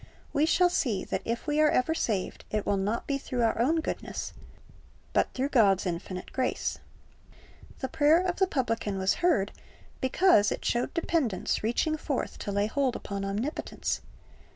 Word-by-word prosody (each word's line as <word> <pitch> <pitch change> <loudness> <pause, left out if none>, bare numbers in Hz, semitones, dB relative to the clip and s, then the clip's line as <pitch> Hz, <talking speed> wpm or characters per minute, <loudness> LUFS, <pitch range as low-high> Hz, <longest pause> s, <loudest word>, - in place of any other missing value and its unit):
We 300 +2 +3
shall 355 +1 +4
see 225 - 0
that - - -3
if 230 +1 -2
we 300 0 0
are 305 - +6
ever 275 +5 +2
saved, 210 - -2
it 210 -1 -1
will 200 - +2
not 205 +4 -1
be 275 -1 -1
through 250 -3 -2
our 225 0 +1
own 320 +6 +2
goodness, - - -4 0.8
but - - +2
through 265 +2 0
God's 200 -8 +4
infinite 180 +1 -4
grace. 255 -1 -1 1.0
The 265 - -1
prayer 300 +4 +4
of 360 -1 -1
the 380 - +3
publican 230 - -1
was 190 0 +2
heard 230 - +3 0.5
because 260 - +4
it - - -4
showed 240 0 0
dependence 315 - 0
reaching 245 +8 0
forth 290 -3 -3
to 205 - -4
lay 200 +1 +1
hold 260 +3 0
upon 200 -1 -4
Omnipotence. 210 +10 -2
250 Hz, 165 wpm, -28 LUFS, 205-305 Hz, 1.0 s, are